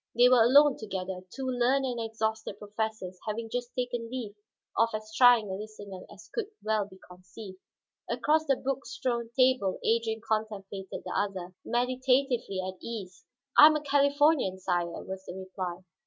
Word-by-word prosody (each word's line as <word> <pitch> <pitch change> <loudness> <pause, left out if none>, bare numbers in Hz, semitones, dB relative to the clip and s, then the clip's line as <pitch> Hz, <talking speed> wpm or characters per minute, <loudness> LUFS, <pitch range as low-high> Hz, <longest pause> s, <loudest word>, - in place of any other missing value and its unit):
They 245 +1 +7
were 250 -2 +6
alone 280 +4 +6
together, 190 -3 -4
two 270 - -5
learned 255 +2 +2
and 245 -2 -2
exhausted 220 -2 -3
professors 210 -3 -4
having 225 +1 -3
just 245 -1 -3
taken 245 -2 -3
leave 240 -5 -5 0.4
of 230 - +3
as 215 0 -7
trying 245 -3 +6
a - - -2
listener 205 -2 -8
as 210 +2 -13
could 460 -4 -2 0.2
well 215 -1 +1
be 190 -2 -15
conceived. 185 +2 -12 0.5
Across 315 +1 +2
the 275 - +4
book 270 +1 -3
strewn 235 -2 -2
table 255 -7 +3
Adrian 225 -1 +1
contemplated 205 -3 -3
the - - -4
other, 190 -3 -2
meditatively 250 -3 +1
at 185 -1 -8
ease. 195 -6 -7 0.3
"I 300 - +11
am 310 - +4
a 300 - -1
Californian, 285 -6 +3
sire," 175 -2 -2
was 190 0 -7
the 180 - -6
reply. 185 -2 -5
220 Hz, 160 wpm, -29 LUFS, 195-255 Hz, 0.5 s, I